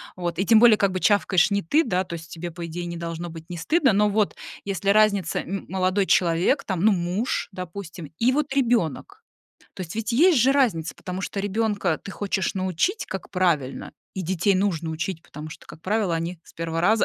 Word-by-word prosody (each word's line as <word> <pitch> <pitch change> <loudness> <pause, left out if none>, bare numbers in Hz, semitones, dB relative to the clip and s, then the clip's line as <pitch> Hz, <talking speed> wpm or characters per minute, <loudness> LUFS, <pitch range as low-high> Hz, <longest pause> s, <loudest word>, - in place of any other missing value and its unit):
Вот. 175 -1 -4
И 195 - +1
тем 225 -2 +6
более, 230 -3 +7
как 200 -2 +2
бы, 185 - -1
чавкаешь 205 -2 +3
не 200 0 +1
ты, 295 - +2
да, 185 - 0
то 170 - -8
есть 165 0 -8
тебе, 175 +1 -6
по 170 +1 -6
идее, 175 +1 -5
не 170 0 -5
должно 170 0 -5
быть 165 +1 -11
не 175 - -5
стыдно. 270 - +2
Но 210 +1 +3
вот 210 0 +1 0.3
если 195 0 -2
разница: 205 -4 +3
м 195 +2 -5
молодой 190 +1 +1
человек, 175 - +2
там, 185 -4 -2
ну, 220 +1 +5
муж, 180 +6 -1
допустим, 180 -4 -8
и 245 +3 +3
вот 285 -1 -1
ребёнок. 245 - 0 0.5
То 190 - -5
есть 165 -2 -7
ведь 225 0 -2
есть 315 +4 +5
же 255 +4 +4
разница, 210 - +1
потому 185 +1 -6
что 200 - -4
ребёнка 205 -4 0
ты 195 - -8
хочешь 195 -2 -2
научить, 190 - -1
как 190 - -6
правильно, 170 -8 0 0.2
и 190 - -3
детей 190 +3 +1
нужно 175 -4 0
учить. 165 +1 -4
Потому 150 +1 -9
что, - - -12
как 160 - -12
правило, 200 -2 0
они 165 +1 -4
с - - -17
1 165 0 -3
раза 215 +5 +3
190 Hz, 210 wpm, -24 LUFS, 170-210 Hz, 0.5 s, более